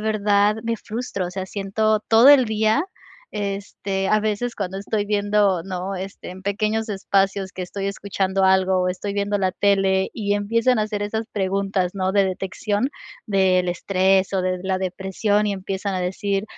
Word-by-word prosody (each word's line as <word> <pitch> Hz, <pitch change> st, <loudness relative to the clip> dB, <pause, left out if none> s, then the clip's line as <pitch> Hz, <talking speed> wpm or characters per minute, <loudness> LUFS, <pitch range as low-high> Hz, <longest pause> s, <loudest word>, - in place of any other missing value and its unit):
verdad 210 Hz, -1 st, +2 dB
me 230 Hz, 0 st, -1 dB
frustro, 215 Hz, -4 st, -4 dB
o -, -, -6 dB
sea, 190 Hz, 0 st, -4 dB
siento 210 Hz, +2 st, 0 dB
todo 230 Hz, +4 st, +7 dB
el 280 Hz, -3 st, +7 dB
día, 220 Hz, +6 st, +1 dB, 0.5 s
este, 195 Hz, -1 st, -3 dB
a 215 Hz, +1 st, +3 dB
veces 215 Hz, +3 st, -2 dB
cuando 190 Hz, -2 st, -3 dB
estoy 205 Hz, +1 st, -2 dB
viendo, 205 Hz, -3 st, +2 dB
¿no?, 185 Hz, +1 st, -4 dB
este, 190 Hz, +1 st, -7 dB
en 185 Hz, +1 st, -10 dB
pequeños 215 Hz, +3 st, -1 dB
espacios 195 Hz, -1 st, 0 dB
que 185 Hz, -, -5 dB
estoy 195 Hz, +2 st, -4 dB
escuchando 195 Hz, -1 st, -1 dB
algo 190 Hz, 0 st, +3 dB
o 180 Hz, -, +1 dB
estoy 200 Hz, +2 st, -4 dB
viendo 205 Hz, 0 st, 0 dB
la 190 Hz, -1 st, 0 dB
tele 195 Hz, -1 st, +2 dB
y 205 Hz, -3 st, 0 dB
empiezan 230 Hz, +4 st, +1 dB
a -, -, +2 dB
hacer 210 Hz, -1 st, -3 dB
esas 220 Hz, +2 st, -2 dB
preguntas, 195 Hz, -2 st, -1 dB
¿no?, 190 Hz, -1 st, -1 dB
de 200 Hz, -1 st, +4 dB
detección 205 Hz, +6 st, -2 dB, 0.4 s
del 185 Hz, -3 st, +2 dB
estrés 190 Hz, +2 st, +1 dB
o 185 Hz, -, +1 dB
de 185 Hz, 0 st, -1 dB
la 190 Hz, 0 st, 0 dB
depresión, 190 Hz, +3 st, 0 dB
y 205 Hz, -, 0 dB
empiezan 195 Hz, +1 st, -4 dB
a 185 Hz, -, -1 dB
decir: 195 Hz, +2 st, -1 dB
200 Hz, 175 wpm, -22 LUFS, 190-210 Hz, 0.5 s, todo